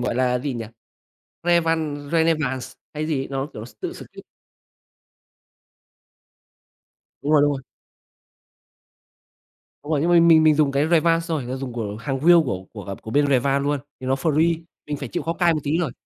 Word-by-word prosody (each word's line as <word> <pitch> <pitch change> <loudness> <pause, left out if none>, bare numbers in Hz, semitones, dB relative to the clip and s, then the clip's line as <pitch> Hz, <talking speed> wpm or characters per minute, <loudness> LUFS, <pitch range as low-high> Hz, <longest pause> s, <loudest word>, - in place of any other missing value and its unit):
gọi 120 -1 -1
là 125 0 +1
gì 135 +1 -3
nhỉ? 115 -1 -4 0.8
Revanced 160 -4 0
Re 165 -1 +3
ne 165 0 +4
vàng 130 -4 -2
x 130 - -9 0.2
hay 155 +1 -2
gì, 140 -4 -2
nó, 135 0 -3
kiểu, 110 - -8
s 120 - -16
tự - - -4
skip. - - -12 3.0
Đúng 145 +2 0
rồi, 150 -2 +6
đúng 145 - +3
rồi. 135 -1 -5 2.2
Đúng 150 - -9
rồi, 150 - +2
nhưng 170 +4 +1
mình 170 -1 +6
mình 160 -1 +7
mình 155 -1 +5
dùng 145 -2 +2
cái 140 +3 +1
Revanced 165 0 +3
xong 160 -2 0
rồi, 125 -2 -6
ờ, 130 - -2
dùng 130 -2 -5
của 105 -3 -4
hàng 135 +3 -3
real 175 0 +8
của 95 -6 -4
của, 105 -3 -8
à, 100 - -5
của 110 - -8
bên 145 +3 +3
Revanced 140 0 +2
luôn, 145 -1 0 0.2
thì 130 - -6
nó 130 - +2
free 160 +4 +1 0.2
mình 150 - -3
phải 140 -2 -6
chịu - - -3
khó 165 - -1
cài 170 -1 +2
một 155 - -2
tí 145 - -2
thôi. 155 -8 -2
145 Hz, 200 wpm, -22 LUFS, 130-160 Hz, 3.0 s, real